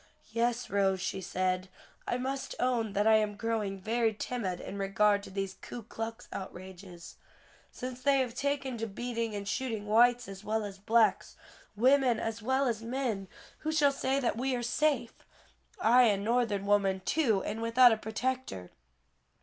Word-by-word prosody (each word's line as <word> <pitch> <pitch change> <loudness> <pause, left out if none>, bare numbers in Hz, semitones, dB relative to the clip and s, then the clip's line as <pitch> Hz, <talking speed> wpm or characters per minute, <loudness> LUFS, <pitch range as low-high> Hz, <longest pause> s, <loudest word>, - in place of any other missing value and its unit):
"Yes, 235 +2 -1
Rose," 195 -1 +2
she 190 +1 -3
said, 185 0 -1 0.4
"I 245 - 0
must 265 +2 -4
own 235 -4 0
that 205 +1 +1
I 220 0 +6
am 210 -1 0
growing 210 -3 -2
very 225 +2 0
timid 200 -6 -3
in 200 - -7
regard 200 +1 +2
to - - -10
these 195 0 -4
Ku 240 - -8
Klux 225 +2 -6
outrages. 185 -1 -9 0.5
Since 255 0 -7
they 280 +1 +4
have 255 -3 0
taken 270 -2 -2
to 225 - -2
beating 230 +1 -3
and 200 -1 -5
shooting 220 -2 -2
whites 240 +3 +4
as 195 0 -9
well 215 +1 -1
as 200 -1 -8
blacks, 220 +2 +2 0.4
women 255 0 +4
as 225 0 -3
well 260 +4 +1
as 230 -4 -1
men, 230 -5 -2 0.3
who 310 - -2
shall 295 -3 +4
say 270 0 0
that 245 -4 -1
we 260 +1 0
are 240 - -3
safe? 245 -1 +1 0.7
I 250 -5 +6
a 210 -3 +3
Northern 210 -1 0
woman 200 -2 +2
too 235 -11 +2
and 220 +2 -4
without 235 +2 +6
a 220 - +2
protector." 220 - -3
225 Hz, 165 wpm, -30 LUFS, 200-250 Hz, 0.7 s, I